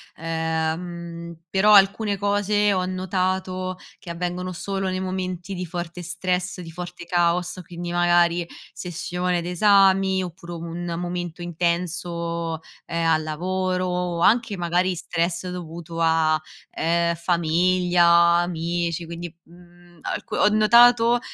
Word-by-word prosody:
ehm, 165 +1 -3
però 200 +4 +4
alcune 200 +1 +4
cose 205 +1 +1
ho 185 - 0
notato 185 0 -2 0.2
che - - -11
avvengono 180 +2 -3
solo 195 +1 -3
nei 185 0 -2
momenti 185 0 -4
di 180 -1 -4
forte 175 +1 -5
stress, 180 +1 -2
di 165 -2 -9
forte 175 +1 -8
caos, 175 +1 0
quindi 175 +1 -6
magari 175 0 +3 0.3
sessione 180 0 -2
d'esami 190 +1 +4
oppure 175 0 -8
un 170 +1 -5
momento 175 -1 -4
intenso, 170 -1 -2 0.3
ehm, 165 0 -1
al 160 -1 +3
lavoro 185 +4 -2
o 180 -1 -2
anche 220 +1 +3
magari 175 +1 0
stress 170 +2 -2
dovuto 170 -1 -7
a, 160 -1 +3 0.4
ehm, 170 +1 +1
famiglia, 175 +1 +2 0.3
amici, 170 0 -2
quindi, 170 0 -7
mhmm, 175 0 -19
alc - - -5
ho - - +3
notato, 235 +2 +5
175 Hz, 120 wpm, -23 LUFS, 170-185 Hz, 0.4 s, notato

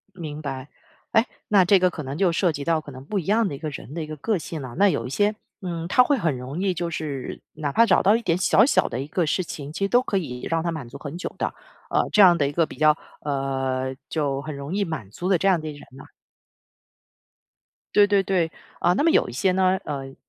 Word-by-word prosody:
明 155 -4 -6
白， 135 -2 -5 0.4
哎， 225 +2 +4 0.2
那 200 -3 +5
这 195 +2 +5
个 185 0 +3
可 160 - -6
能 135 0 -5
就 185 -3 +3
涉 170 0 +2
及 145 -2 -5
到 165 0 +2
可 150 - -11
能 130 0 -10
不 200 +8 -2
一 180 - -3
样 215 +1 +3
的 145 - -5
一 - - -7
个 155 - -4
人 140 0 -9
的 165 - -3
一 - - -5
个 155 0 -7
个 205 +7 0
性 160 -1 -6
了。 125 -2 -7
那 200 +1 +6
有 115 -10 -1
一 - - -6
些， 205 +8 +1 0.3
嗯， 170 -3 -4
他 250 - +6
会 285 +2 +2
很 160 - 0
容 130 +7 -6
易 190 -1 +1
就 175 0 -3
是 145 -5 -5
哪 145 -2 -3
怕 230 +7 +5
找 195 - +4
到 205 +4 +5
一 235 - -4
点 170 -6 +1
小 195 +3 +5
小 275 - +3
的 120 - -4
一 135 - -4
个 165 +3 0
事 170 +5 +1
情， 145 -3 -7
其 195 +4 -2
实 - - +1
都 245 +4 +4
可 200 -6 0
以 125 -8 -6
让 165 -1 +1
他 170 - -1
满 150 -7 -6
足 140 - -10
很 145 +2 -7
久 - - -5
的， - - -2 0.4
呃， - - +1
这 210 - +6
样 180 -3 +8
的 140 - +2
一 - - -5
个 165 +2 +2
比 - - -11
较， 155 0 +4 0.3
呃 135 -2 -1
就 140 -4 -1
很 155 -1 -6
容 140 +5 -5
易 200 0 +1
满 155 - -5
足 175 - -4
的 190 -2 +4
这 195 - -1
样 185 -4 +3
的 155 - -5
一 - - -5
个 145 - -12
人 - - -13
呢。 135 - -11 1.9
对 205 -1 +7
对 200 -1 +3
对， 180 -4 0 0.3
啊， 175 - +3
那 185 - +1
么 330 - +4
有 - - +3
一 - - -7
些 155 +10 +1
呢， 185 0 +2
呃， 135 -2 -5
165 Hz, 290 characters per minute, -24 LUFS, 140-190 Hz, 1.9 s, 样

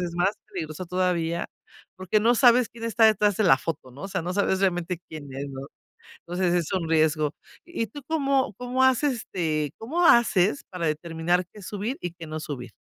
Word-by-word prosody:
es 175 -1 -3
más 180 +3 +3 0.2
peligroso 175 -4 -6
todavía 170 -2 0 0.5
porque 185 +3 +1
no 235 +3 +4
sabes 245 -1 +5
quién 230 -1 -13
está 230 0 +3
detrás 210 -2 +4
de 215 - +1
la 135 -7 +6
foto, 145 -5 -5
¿no? 140 - -11
O 195 - -5
sea, 190 -3 -2
no 175 +2 -3
sabes 190 -1 +1
realmente 175 -2 0
quién 155 -2 -8
es, 135 +2 -5
¿no? 135 +1 -8 0.5
Entonces, 175 0 -1
es 175 -3 0
un 170 -4 -1
riesgo. 155 -2 +2 0.3
¿Y 345 -11 -3
tú 290 +8 -10
cómo 275 -7 +1
cómo 250 +1 0
haces, 260 0 +3
este, 155 -5 -2
cómo 330 +10 0
haces 230 - +4
para 180 -2 -4
determinar 165 +3 0
qué 210 - -12
subir 210 +7 -4
y 175 - -3
qué 170 -1 -10
no 155 0 -5
subir? 125 -6 -6
180 Hz, 195 wpm, -25 LUFS, 165-225 Hz, 0.5 s, la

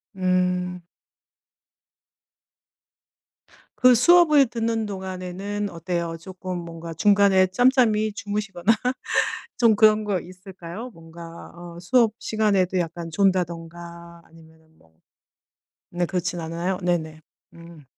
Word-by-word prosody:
음. 180 -1 -1 2.9
그 255 -1 +5
수업을 305 +1 +5
듣는 225 -1 -2
동안에는 190 +1 -5
어때요? 170 0 -4
조금 185 +1 -7
뭔가 165 -1 -8
중간에 195 +1 +4
짬짬이 220 -1 +2
주무시거나 205 -2 -2 0.9
좀 230 -3 +4
그런 215 0 +4
거 200 -3 -1
있을까요? 185 +4 -10
뭔가 165 0 -12
어 170 0 -10
수업 220 +4 +2
시간에도 200 -4 0
약간 170 0 -4
존다든가 170 -2 -2
아니면은 160 -1 -21
뭐 80 -1 -27 1.0
네 175 0 -1
그렇진 180 -1 -3
않아요? 170 +3 -3
네네. 160 -3 -2 0.3
음. 165 -3 -14
180 Hz, 225 characters per minute, -23 LUFS, 170-205 Hz, 2.9 s, 그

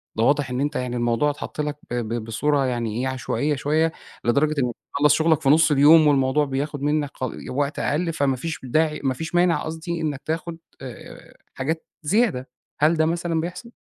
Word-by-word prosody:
ده 110 - +1
واضح 140 0 +2
إن 125 +2 -2
أنت 145 +1 -1
يعني 125 -1 -2
الموضوع 120 +4 +1
اتحط 145 +1 -5
لك 150 0 -3
ب - - -2
ب 115 -1 -2
بصورة 140 +5 0
يعني 120 -3 -2
إيه، 130 - -1
عشوائية 135 +3 -1
شوية، 155 +4 +1 0.3
لدرجة 145 +6 +2
إنك 120 -1 -1 0.2
تخلص 145 +1 +4
شغلك 160 -1 +2
في 135 - +2
نص 155 +1 +5
اليوم 150 +3 +7
والموضوع 140 +1 +3
بياخد 140 +1 -3
منك 145 0 0
ق 130 - -4 0.2
وقت 145 +2 -2
أقل 165 +3 0
فما 140 -3 +1
فيش 160 +5 -5
داعي 155 +4 0
ما 135 -1 +1
فيش 160 +6 -6
مانع 175 -1 +3
قصدي 160 +1 -4
إنك 145 -4 -2
تاخد 165 +1 -3 0.2
آآ، 130 -3 -11 0.2
حاجات 160 +5 -3 0.2
زيادة. 175 - +1 0.3
هل 155 +3 +4
ده 160 - +3
مثلًا 165 0 -1
بيحصل؟ 180 +8 -7
145 Hz, 190 wpm, -23 LUFS, 130-160 Hz, 0.3 s, اليوم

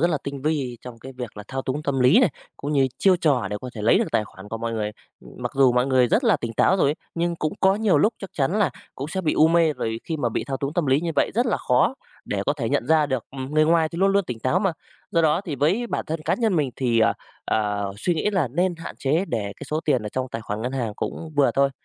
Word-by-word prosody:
rất 170 +2 +3
là 155 - 0
tinh 140 -1 -5
vi 140 -6 -1
trong 120 -2 -9
cái 130 +3 -10
việc 120 -4 -6
là 105 - -7
thao 130 0 -3
túng 140 +3 -3
tâm 140 -3 -1
lý 125 +2 +6
này, - - +4 0.3
cũng 145 +2 -4
như 135 -2 +3
chiêu 190 -2 +4
trò 140 - +1
để 105 - -2
có 125 -1 -7
thể 105 - -6
lấy 110 - +5
được - - +2
tài 110 - +2
khoản 100 +1 -13
của 115 - -5
mọi 115 0 -3
người. 105 -2 -2 0.3
Ừm, - - -14
mặc - - -4
dù 135 -2 +5
mọi 125 +1 +2
người 130 -2 +3
rất 250 - +2
là 215 -8 +4
tỉnh 115 -4 -5
táo 190 - +3
rồi 160 - +3
ấy, - - -1 0.2
nhưng 170 0 -1
cũng 155 -1 -2
có 190 +1 +5
nhiều 205 -8 +2
lúc 215 +8 +3
chắc 195 - -8
chắn 160 +9 0
là 190 -9 +3 0.2
cũng 140 +3 -5
sẽ 190 +3 -2
bị 160 - 0
u 155 +1 +5
mê, 165 -2 +3
rồi 115 -4 -3
khi 160 - -3
mà 125 -5 0
bị 110 - -3
thao 135 -1 -3
túng 140 +2 -3
tâm 175 -5 0
lý 135 +2 +3
như 170 0 -2
vậy - - +2
rất 240 +2 +2
là - - +1
khó 125 - +2 0.3
để 100 -1 -2
có - - +3
thể 135 -6 -3
nhận 120 - 0
ra 155 -1 +4
được, 130 -4 -2
ừm, 135 +2 -6
người 155 0 +5
ngoài 160 0 +3
thì 170 - -7
luôn 195 +1 +3
luôn 200 -1 +2
tỉnh 125 -6 -5
táo 130 +10 +2
mà. 195 -3 +1 0.4
Do 165 - +2
đó 155 +2 +3
thì 165 -8 -5
với 180 - +1
bản - - -3
thân 160 0 -3
cá - - +2
nhân 225 -6 +1
mình 145 -5 +1
thì, 120 -3 +1
à, - - +4 0.3
à, 105 -2 0
suy 175 - 0
nghĩ 165 +6 0
là 180 - +1
nên 175 +6 0
hạn 165 - -8
chế, 155 +7 +1
để 105 -4 -2
cái - - -8
số 155 - 0
tiền 130 -7 +2
ở 105 - -4
trong 130 +4 -3
tài 115 - -5
khoản 110 0 -4
ngân 125 +2 -2
hàng 120 -5 -2
cũng 165 - -5
vừa 140 - +4
thôi. 140 0 +3
140 Hz, 300 wpm, -23 LUFS, 125-170 Hz, 0.4 s, lý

